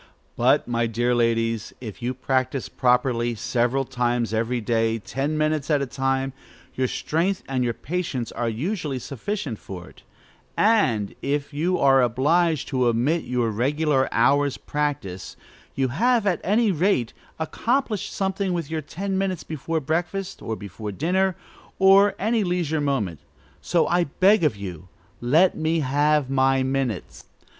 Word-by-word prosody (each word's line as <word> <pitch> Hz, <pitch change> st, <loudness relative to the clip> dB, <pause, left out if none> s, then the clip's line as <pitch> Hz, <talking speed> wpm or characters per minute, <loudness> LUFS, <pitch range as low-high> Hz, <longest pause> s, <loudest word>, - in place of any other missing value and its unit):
But, -, -, +3 dB
my 120 Hz, -1 st, 0 dB
dear 120 Hz, +2 st, 0 dB
ladies, 115 Hz, -2 st, 0 dB
if 115 Hz, 0 st, -8 dB
you 125 Hz, +2 st, -2 dB
practise 130 Hz, +1 st, -1 dB
properly, 125 Hz, -2 st, +1 dB
several 125 Hz, +3 st, 0 dB
times 120 Hz, -2 st, -1 dB
every 115 Hz, +2 st, 0 dB
day, 115 Hz, 0 st, +1 dB
ten 140 Hz, +7 st, -3 dB
minutes 155 Hz, -1 st, 0 dB
at 150 Hz, -2 st, +3 dB
a -, -, -1 dB
time, 135 Hz, 0 st, -1 dB, 0.4 s
your 130 Hz, 0 st, 0 dB
strength 170 Hz, +9 st, -1 dB
and 130 Hz, -2 st, 0 dB
your 120 Hz, -2 st, -1 dB
patience 150 Hz, -7 st, -3 dB
are 120 Hz, -1 st, -2 dB
usually 150 Hz, -, -2 dB
sufficient 135 Hz, -, -4 dB
for 90 Hz, -2 st, -9 dB
it; -, -, -19 dB, 0.6 s
and, 130 Hz, -, +2 dB
if 145 Hz, +1 st, -2 dB
you 175 Hz, +5 st, 0 dB
are 135 Hz, -1 st, +5 dB
obliged 150 Hz, +6 st, +2 dB
to 130 Hz, -3 st, +1 dB
omit 125 Hz, +9 st, +1 dB
your 120 Hz, -3 st, 0 dB
regular 135 Hz, +4 st, +1 dB
"hour's 140 Hz, +4 st, +2 dB
practice," 140 Hz, -11 st, -3 dB, 0.4 s
you 135 Hz, -1 st, +1 dB
have, 230 Hz, -, +2 dB
at 185 Hz, -4 st, +1 dB
any 215 Hz, +2 st, +3 dB
rate, 170 Hz, -, +1 dB, 0.2 s
accomplished 225 Hz, -, -1 dB
something 190 Hz, -1 st, -1 dB
with 165 Hz, -3 st, -3 dB
your 160 Hz, -1 st, -1 dB
ten 190 Hz, +6 st, -3 dB
minutes 190 Hz, -3 st, -1 dB
before 160 Hz, +1 st, -3 dB
breakfast, 175 Hz, +6 st, -3 dB
or 110 Hz, -, -3 dB
before 105 Hz, +1 st, -7 dB
dinner, 185 Hz, -, +1 dB, 0.4 s
or 195 Hz, +1 st, +7 dB
at 200 Hz, -, -4 dB
any 220 Hz, +1 st, +1 dB
leisure 175 Hz, -4 st, 0 dB
moment. 110 Hz, -, -1 dB, 0.4 s
So, 170 Hz, -, +1 dB
I 175 Hz, 0 st, +2 dB
beg 190 Hz, +6 st, +3 dB
of 150 Hz, -8 st, +2 dB
you, 90 Hz, -4 st, -8 dB, 0.3 s
let 155 Hz, +10 st, +4 dB
me 160 Hz, +1 st, 0 dB
have 145 Hz, +1 st, +2 dB
my 135 Hz, 0 st, +2 dB
minutes. 130 Hz, -6 st, -3 dB
135 Hz, 150 wpm, -24 LUFS, 120-170 Hz, 0.6 s, or